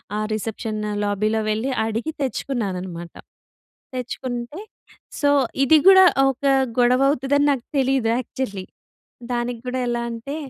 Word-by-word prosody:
ఆహ్, 215 0 -2
రిసెప్షన్ 215 0 -4 0.2
లాబీలో 215 +2 0
వెళ్ళి, 220 +5 -1 0.2
అడిగి 225 +8 -2
తెచ్చుకున్నాననమాట. 190 -10 -4 0.8
తెచ్చుకుంటే 250 +3 -5 0.6
సో, 285 - +2 0.3
ఇది 310 +4 +6
గూడా 380 0 +9 0.3
ఒక 270 +1 -5 0.4
గొడవ 250 +2 +4
అవుతుదని 285 +1 +1
నాకు 265 -4 -2
తెలీదు 265 -3 +1
యాక్చల్‌లీ. 245 -6 -4 0.7
దానికి 240 0 -2
గూడా 250 +1 -2
ఎలా 240 0 -1
అంటే 235 +5 -6
240 Hz, 115 wpm, -22 LUFS, 215-270 Hz, 0.8 s, గూడా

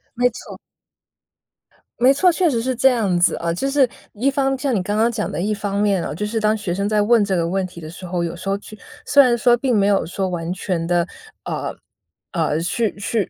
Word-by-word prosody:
没 245 +1 +3
错。 - - -10 1.4
没 255 +2 +6
错， 360 +6 +4
确 345 0 +2
实 235 -4 0
是 255 +1 -1
这 265 +3 +5
样 215 -8 +1
子 175 - +3
啊。 170 0 -2
就 270 +11 -2
是 275 -2 +3 0.3
一 250 +6 +1
方 270 -1 0
像 260 -1 -1
你 195 - +1
刚 205 +3 -2
刚 230 +2 +3
讲 215 -2 -3
的 - - -4
一 205 +4 0
方 200 -1 -3
面 200 -4 +1
啊， - - -4
就 210 - -3
是 225 +2 -2
当 215 0 +2
学 185 -4 -3
生 200 +2 -1
在 210 -1 +2
问 220 0 +4
这 195 -2 0
个 170 -1 0
问 190 +1 -1
题 175 -1 -12
的 155 -2 -8
时 180 +3 -10
候， 175 -1 -2
有 170 0 -3
时 195 +3 -6
候 195 - +1
去 215 +1 -12 0.3
虽 285 -1 +6
然 240 -3 +3
说 240 +1 +4
并 250 -1 0
没 200 0 +3
有 200 -1 +2
说 190 +3 -3
完 175 -2 -3
全 180 -3 -2
地 175 0 +1 0.4
呃， - - -4 0.6
呃， 160 -3 0
去 210 +6 -1
去 205 0 -2
205 Hz, 255 characters per minute, -20 LUFS, 180-240 Hz, 1.4 s, 没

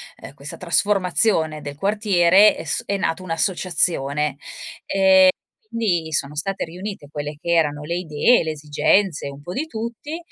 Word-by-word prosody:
ehm, - - -12
questa - - -7
trasformazione 180 -5 +1
del 145 -1 -8
quartiere 200 +1 +4
è - - -7
s - - 0
è 200 - -1
nata 185 -2 -2
un'associazione 165 -5 0 0.5
e 190 -1 +5 0.4
quindi 185 -9 -2
sono 140 0 -1
state 195 +4 -2
riunite 180 -3 -8
quelle 150 0 -5
che 170 - -6
erano 150 -3 +1
le 170 +3 -3
idee, 170 +8 +2
le 160 - -3
esigenze, 155 +3 0
un 140 0 -9
po' 175 - -8
di 285 - -3
tutti 235 +5 -6
175 Hz, 150 wpm, -21 LUFS, 150-200 Hz, 0.5 s, e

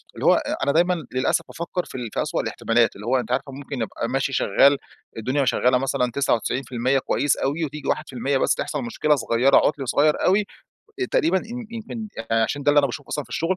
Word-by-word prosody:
اللي - - -5
هو - - +7
أ - - -2
أنا 140 - +2
دايمًا 175 +4 +3 0.2
للأسف 130 0 +1
بافكر 170 +2 -4
في - - -12
ال 120 -3 -4
في - - 0
أسوأ - - -1
الاحتمالات، 115 -1 +1
اللي 105 - -10
هو 130 +2 +3
أنتِ 120 0 -5
عارفة 135 +2 -1
ممكن 135 -2 -6
أبقى 115 +2 -3
ماشي 135 +1 -1
شغّال 140 +5 +4 0.4
الدنيا 130 +5 0
شغّالة 125 0 +3
مثلًا 130 -1 0
99% 130 0 0
كويّس 145 +2 0
أوي 150 +4 -1
وتيجي 150 0 -7
1% 135 -2 -1
بس - - +2
تحصل 145 -3 -3
مشكلة 150 +6 +1
صغيرة، 125 +2 +3
عُطْل 140 -3 +1
صغيَّر 150 +4 +3
أوي، 200 +3 +3 0.7
تقريبًا 175 +4 +2
إن 235 +3 -7
يمكن 225 -1 -6 0.2
آآ، 115 0 +3
عشان 145 +5 -2
ده 145 - +4
اللي 145 - +4
أنا 145 - +5
باشوفه 140 +2 -7
أصلًا 145 - -3
في - - -22
الشغل، 175 +3 -1
135 Hz, 210 wpm, -23 LUFS, 125-150 Hz, 0.7 s, هو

